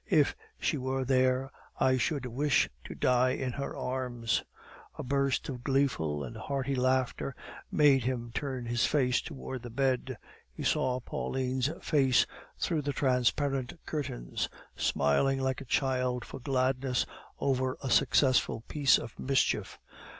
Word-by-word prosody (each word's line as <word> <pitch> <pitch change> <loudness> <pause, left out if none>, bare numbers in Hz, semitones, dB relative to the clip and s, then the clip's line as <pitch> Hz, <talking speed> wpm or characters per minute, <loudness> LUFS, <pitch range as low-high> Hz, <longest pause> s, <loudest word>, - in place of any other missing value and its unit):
"If - - +4 0.2
she 150 - 0
were 130 0 -1
there, 130 0 +2 0.3
I 130 0 +4
should 135 +1 -1
wish 135 +4 +2 0.2
to - - -7
die 125 0 +3
in 130 -1 -2
her 140 +3 -4
arms." 125 -3 -1 0.6
A - - -4
burst 140 +1 0
of 125 -3 -6
gleeful 125 - +1
and 60 - -7
hearty 140 -1 -2
laughter 130 0 0 0.4
made 140 -4 +5
him 120 -2 -2
turn 130 -3 -3
his 120 +1 +1
face 125 -4 +2
towards 130 -1 -6
the 120 - -7
bed; 130 0 0 0.3
he - - -7
saw 130 0 +1
Pauline's 130 +1 -1
face 135 -5 +4 0.3
through 160 -3 0
the 145 0 -2
transparent 135 +2 +1
curtains, 90 - -3 0.3
smiling 75 - +2
like 130 0 -1
a - - -8
child 125 -1 0
for - - -8
gladness 130 -1 +1 0.3
over 130 -1 0
a 130 - -2
successful 130 0 +3
piece 145 -3 +4
of 115 - -8
mischief. 135 0 +1
130 Hz, 140 wpm, -30 LUFS, 125-135 Hz, 0.6 s, made